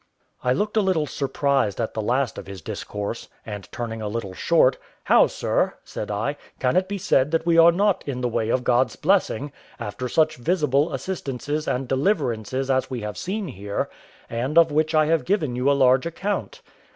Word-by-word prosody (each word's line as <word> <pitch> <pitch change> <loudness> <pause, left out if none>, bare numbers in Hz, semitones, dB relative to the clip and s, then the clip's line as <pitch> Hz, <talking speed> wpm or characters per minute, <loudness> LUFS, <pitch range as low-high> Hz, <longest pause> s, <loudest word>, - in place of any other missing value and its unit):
I 125 - +2
looked 210 - 0
a - - +5
little 185 -6 +1
surprised 140 -5 0
at 115 - -2
the 110 - -2
last 125 +3 0
of - - -10
his 95 -4 -9
discourse, 105 +3 -5 0.2
and 105 -3 -7
turning 115 -2 -5
a 105 - -3
little 105 -3 -4
short, 130 - +3 0.2
"How, - - +5
sir," - - 0
said 105 - -6
I, 110 +8 -2 0.2
"can 125 +4 +1
it 185 +1 +2
be 205 - -2
said 145 -7 +2
that 165 +1 0
we 165 -1 +4
are 165 +1 +8
not 200 +2 +1
in 130 -3 -3
the 125 - +1
way 110 -1 -1
of 125 +1 +1
God's 125 +1 +2
blessing, 150 - +1 0.3
after 125 +5 -4
such 155 +2 +2
visible 150 +1 +1
assistances 150 -3 -3
and 130 +1 -1
deliverances 135 - 0
as 130 0 +1
we 125 -3 -4
have 105 0 -5
seen 195 0 -3
here, 100 -3 -4 0.4
and 125 +7 -2
of 165 -2 +6
which 155 +2 +1
I 155 0 +5
have 165 +1 +2
given 160 -10 0
you 125 +3 +1
a - - +5
large 130 +2 +4
account?" 205 - -3
135 Hz, 195 wpm, -24 LUFS, 120-165 Hz, 0.4 s, are